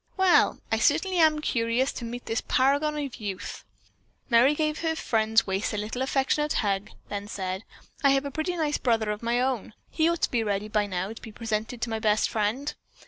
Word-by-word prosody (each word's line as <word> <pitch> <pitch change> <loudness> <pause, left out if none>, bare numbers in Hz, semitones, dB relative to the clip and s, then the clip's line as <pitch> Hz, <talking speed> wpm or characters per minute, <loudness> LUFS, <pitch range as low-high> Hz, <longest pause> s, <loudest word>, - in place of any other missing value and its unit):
"Well, 380 -2 +4
I 225 - +2
certainly 345 - +2
am 310 -2 +4
curious 235 0 +1
to 235 - -6
meet 240 +1 -6
this 225 - -1
paragon 285 +3 +2
of 280 -4 -3
a - - -9
youth." 195 -2 -5 0.7
Merry 245 +5 +5
gave 305 0 0
her 325 -1 0
friend's 225 -5 +2
waist 195 +3 -1
a - - -2
little 215 +4 -3
affectionate 275 +3 +1
hug, 200 -1 0 0.2
then 205 0 -4
said: 190 -1 -4 0.4
"I 280 - +6
have 275 +1 +3
a 280 - -4
pretty 330 +5 -2
nice 300 -2 0
brother 225 -4 +1
of 210 - -5
my 235 +1 +1
own. 250 -4 -1 0.2
He 320 0 +2
ought 340 0 -2
to - - +2
be 235 -2 +1
ready 205 0 -2
by 210 -1 +1
now 190 +2 -3
to - - -12
be 225 - -9
presented 225 +1 -3
to 235 - -2
my 220 - -1
best 215 -1 +2
friend." 225 +7 -1
235 Hz, 210 wpm, -27 LUFS, 215-285 Hz, 0.7 s, I